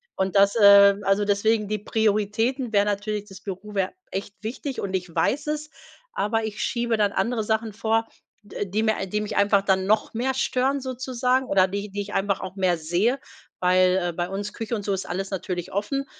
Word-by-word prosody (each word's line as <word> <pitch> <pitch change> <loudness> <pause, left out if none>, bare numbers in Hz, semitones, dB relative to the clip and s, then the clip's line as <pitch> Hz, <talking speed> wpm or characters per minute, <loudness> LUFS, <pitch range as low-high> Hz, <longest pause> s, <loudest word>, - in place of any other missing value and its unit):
Und 190 +1 -1
das, 200 +1 +5
äh 200 -2 +8
also, 195 +1 +2
deswegen 210 +1 +1
die 215 0 -2
Prioritäten 220 +4 0
wäre 205 0 +4
natürlich, 210 0 -2
das 195 0 -12
Büro 200 +2 -7
wäre 190 -2 0 0.2
echt 200 +1 -5
wichtig 255 +5 -5
und 195 -1 -4
ich 180 -2 -4
weiß 290 - 0
es, 300 0 -3 0.4
aber 225 - 0
ich 215 +1 -5
schiebe 235 -2 0
dann 205 -1 +2
andere 225 +3 0
Sachen 220 0 -1
vor, 225 +1 0 0.4
d 205 - -11
äh, 205 - -1
die 210 +4 -1
mir 220 -3 0
die 210 +3 -1
mich 210 - -4
einfach 200 -1 +3
dann 190 -1 +1
noch 215 +2 +1
mehr 255 +4 0
stören 265 +2 0
sozusagen 255 0 -1
oder 190 -3 +4
die 200 +2 -4
die 200 +1 -4
ich 205 +1 -7
einfach 195 0 0
auch 190 0 -7
mehr 185 -3 +1
sehe, 180 - 0 0.4
weil, 185 0 +4
äh, 175 -2 -1
bei 175 +1 -3
uns 200 +2 -4
Küche 225 +1 -3
und 205 -2 -5
so 200 - 0
ist 190 - -3
alles 195 +2 -3
natürlich 180 -2 -4
offen. 275 +8 -1
205 Hz, 210 wpm, -24 LUFS, 195-225 Hz, 0.4 s, äh